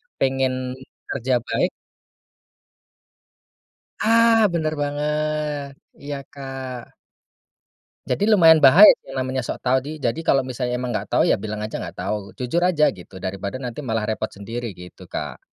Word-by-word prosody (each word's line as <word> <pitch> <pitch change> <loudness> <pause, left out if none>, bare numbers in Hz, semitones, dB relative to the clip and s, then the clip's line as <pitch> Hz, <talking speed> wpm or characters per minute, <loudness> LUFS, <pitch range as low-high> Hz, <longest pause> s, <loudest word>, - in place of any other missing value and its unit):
pengen 130 -1 -1 0.3
kerja 130 -1 +1
baik - - 0 2.3
Ah! 225 0 +5
Bener 155 -2 0
banget. 150 0 -2 0.3
Iya, 145 0 -5 0.2
Kak. 135 -3 -7 1.2
Jadi, 205 - +1
lumayan 165 -7 +7
bahaya, 150 +9 +9 0.2
namanya 130 0 -2
sok - - -5
tahu. 130 +1 +3
Di 140 +3 -8
jadi 135 0 -2
kalau 135 -1 +4
misalnya 125 -1 -3
emang 125 0 -3
enggak 105 -3 -3
tahu, - - +2
ya, - - +2
bilang 105 +1 -5
aja 110 - -4
enggak - - -7
tahu. 100 -2 -4
Jujur 125 +7 -1
aja 155 -4 +3
gitu, 95 0 -14
daripada 95 +3 -5
nanti 120 0 -5
malah 115 -6 -2
repot 110 0 -2
sendiri. 115 +1 -7
Gitu, 90 +1 -13
Kak. - - -5
130 Hz, 140 wpm, -22 LUFS, 115-150 Hz, 2.3 s, bahaya